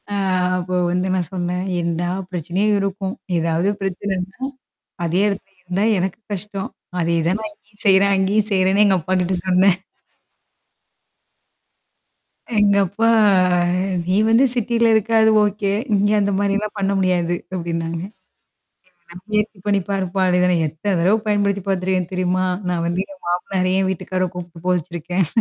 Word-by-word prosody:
அ - - -4 0.4
அப்போ 180 0 -3 0.2
வந்து 180 +1 0
நான் 180 -4 -1
சொன்னேன் 180 0 -2 0.2
"என்டா 170 0 -1 0.2
பிரச்சனைய 185 +5 0
இருக்கும். 195 0 -2 0.2
ஏதாவது 165 +3 +1
பிரச்சனைன்னா? 190 0 -3 0.7
அதே 170 +3 +1
இடத்துல 195 -1 -4
இருந்தா 180 +2 -2 0.2
எனக்கு 185 +2 -2
கஷ்டம். 200 0 -4 0.3
அதேதான் 170 +3 +1
நான் 215 -1 -5
இங்கயும் 205 0 -11
செய்றே, 195 0 +5
அங்கேயும் 200 +3 +1
செய்றேன்னு" 190 +1 +3
எங்க 195 -2 +4
அப்பாகி 185 +2 0
ட்ட 185 - +1
சொன்னேன். 185 0 +4 2.8
எங்கப்பா 200 +1 +2 1.0
"நீ 185 +2 +1
வந்து 230 +4 +5
சிட்டில 235 -1 +1
இருக்க 220 +1 +1
அது 220 0 +5
ஓகே. 205 -1 0 0.2
இங்க 205 +1 +2
அந்த 200 0 +1
மாரிலாம் 205 +1 -1
பண்ண 195 0 0
முடியாது" 175 -2 +1 0.2
அப்டின்னாங்க. 165 -2 -3 1.1
"எப்படியாவது 180 +1 -12
முயற்ச்சி 210 -1 0
பண்ணி 200 -1 +2
பாருப்பா" 190 -1 -1
அப்டினு 180 0 +3
சொன்ன, 180 -2 +2
எத்தன 180 +6 -2
தடவு 195 +6 +4
பயன்படுத்தி 200 -2 +1
பாத்துருக்கேன்னு 185 -1 -1
தெரியுமா? 185 0 0 0.2
நான் 175 -2 -1
வந்து 175 +2 0
என் 190 - -15
மாமனாரயே 185 +1 0
என் 190 - 0
வீட்டுக்கார 185 0 -2
கூப்ட்டு 175 -1 -9
போக 185 - +3
வச்சிருக்கேன். 175 +1 -2
190 Hz, 135 wpm, -20 LUFS, 180-200 Hz, 2.8 s, செய்றே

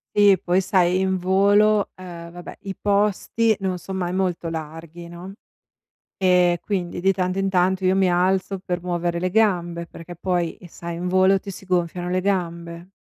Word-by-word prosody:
Sì 205 -2 +6
poi 180 +1 +2
sai 185 -1 +2
in 190 0 +1
volo, 200 +3 +3
uhm, 170 -2 -9
vabbè 175 0 -10
i 195 -1 -5
posti 210 +2 +1
non 185 -2 -1
son 190 +2 -7
mai 175 -2 -2
molto 180 -3 -1
larghi, 165 +2 -7
no, 175 +3 -9 0.9
e 180 -2 +3
quindi, 180 -4 -3
di 190 +2 +3
tanto 185 0 -1
in 195 0 +1
tanto, 185 0 +1
io 185 +1 +3
mi 190 -2 +3
alzo 190 +2 +1
per 180 -2 -4
muovere 175 -1 -1
le 185 +1 -1
gambe 175 -5 +1
perché 170 +1 -10
poi 175 -1 -2
sai 170 +1 -7
in 180 +1 -3
volo 190 +1 +4
ti 200 - -8
si 195 - -10
gonfiano 175 -1 -1
le 185 +1 +1
gambe. 170 -2 -3
180 Hz, 175 wpm, -22 LUFS, 175-190 Hz, 0.9 s, Sì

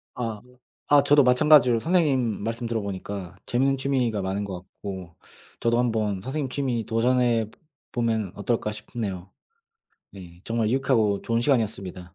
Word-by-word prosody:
아. 115 -4 -4 0.5
아 145 -1 +7
저도 145 0 +5
마찬가지로 125 -2 +5
선생님 135 - +1
말씀 115 +2 -3
들어 115 -1 -1
보니까 100 -2 -6
재밌는 135 +3 +1
취미가 130 -6 0
많은 95 +2 -2
것 100 -2 -5
같고 95 -2 -9 0.4
저도 115 0 +1
한번 110 -5 0
선생님 135 +4 -3
취미 125 -4 -2
도전해 120 0 +2
보 - - -23 0.3
보면 110 -5 -1
어떨까 105 +1 -1
싶네요. 100 -4 -6 0.8
네. 90 -3 -12
정말 115 -1 0
유익하고 120 -6 +2
좋은 115 0 0
시간이었습니다. 100 - -1
115 Hz, 330 characters per minute, -25 LUFS, 100-125 Hz, 0.8 s, 아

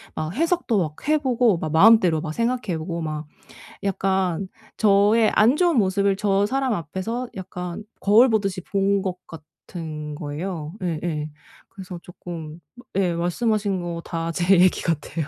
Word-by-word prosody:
아 155 0 -3
해석도 330 - +1
막 155 - -3
해 310 +1 +4
보고 245 - +2
막 155 -2 -4
마음대로 180 -1 +6
막 155 0 -5
생각해 230 -4 -1
보고 170 +2 -4
막 155 -1 -4 0.6
약간 190 -2 0 0.3
저의 210 +2 +4
안 230 +6 +5
좋은 345 -4 +3
모습을 200 -1 +2
저 200 0 +1
사람 265 0 0
앞에서 205 - -4
약간 180 0 -6 0.2
거울 215 +6 +6
보듯이 200 -4 0
본 195 +1 0
것 185 -2 -3
같은 155 -1 -8
거예요. 155 +1 -5
예예. 160 -3 -2 0.4
그래서 185 -2 -9
쪼끔 170 -3 -9 0.4
예. 185 -3 +1
말씀하신 195 +3 0
거 170 -1 -4
다 165 -1 -3
제 175 +2 +3
얘기 185 0 +4
같아요. 160 -1 -2
185 Hz, 275 characters per minute, -23 LUFS, 165-210 Hz, 0.6 s, 마음대로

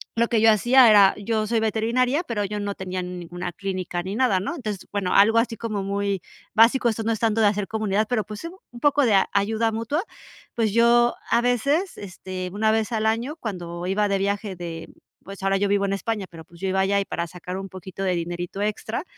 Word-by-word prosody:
lo 235 +1 +2
que 230 - +1
yo 225 0 +7
hacía 240 +4 +6
era, 200 -2 +6
yo 215 +1 -1
soy 230 +1 +1
veterinaria, 235 +6 +1
pero, 230 - -2
yo 210 +1 -4
no 205 0 -3
tenía 185 -1 -4
ninguna 180 0 -6
clínica 185 -2 -4
ni 195 +3 -4
nada, 240 -7 +2
¿no? 210 - -4
Entonces, 215 - -5
bueno, 200 -3 -1
algo 225 +3 +6
así 230 -1 -1
como 215 -3 -3
muy 200 -1 -1 0.3
básico, 235 +2 +5
esto 225 0 -2
no 230 - 0
es 220 - -1
tanto 225 0 +1
de 215 - +5
hacer 205 -1 0
comunidad, 215 -1 0
pero, 230 -3 0
pues, 210 +5 -9 0.3
un 240 - -11
poco 290 +1 +3
de 215 -4 +4 0.2
ayuda 220 +3 +1
mutua. 230 - -2 0.5
Pues, 225 -3 +1
yo 240 +1 +4 0.2
a 235 - +4
veces, 280 - 0
este, 185 -1 -6
una 215 +2 +1
vez 220 0 0
al 220 -1 0
año, 235 +7 -1
cuando 175 - -5
iba 205 +2 +1
de 200 -1 0
viaje 200 0 -2
de 170 -2 -7 0.4
pues, 195 0 -9
ahora 195 0 +2
yo 200 +1 0
vivo 200 0 +2
en 195 - -1
España, 210 0 -2
pero, 165 -1 -11
pues, 170 0 -18
yo 190 - -1
iba 190 +1 +1
allá 200 +1 +2
y 195 - -2
para 170 0 -3
sacar 180 +2 -7
un 195 0 -6
poquito 190 +1 -8
de 185 -1 +1
dinerito 175 +3 -4
extra, 215 +4 -2
205 Hz, 220 wpm, -24 LUFS, 190-230 Hz, 0.5 s, yo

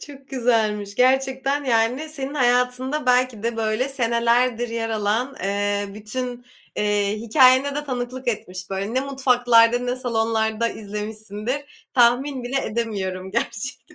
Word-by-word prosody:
Çok 275 -2 -13
güzelmiş 220 -5 0
gerçekten 265 +3 +1
yani, 245 +5 +1
senin 280 -2 -5
hayatında 250 +2 +1
belki 250 -3 +2
de 230 0 -2
böyle 220 +4 0
senelerdir 235 -1 +1
yer 225 0 -3
alan, 220 +5 -1
ııı, 205 0 -1
bütün, 245 +3 -5 0.3
iii, 205 0 +1
hikâyene 260 +4 +4
de 295 0 -3
tanıklık 255 -1 -4
etmiş, 185 -4 -4
böyle, 195 +4 -3
ne 260 - +2
mutfaklarda, 245 -3 +3
ne 245 +1 -2
salonlarda 225 -2 0
izlemişsindir, 215 +6 -6
tahmin 255 +2 +3
bile 265 +2 -1
edemiyorum 195 -5 -3
gerçekten. 235 +4 -4
240 Hz, 125 wpm, -22 LUFS, 215-260 Hz, 0.3 s, hikâyene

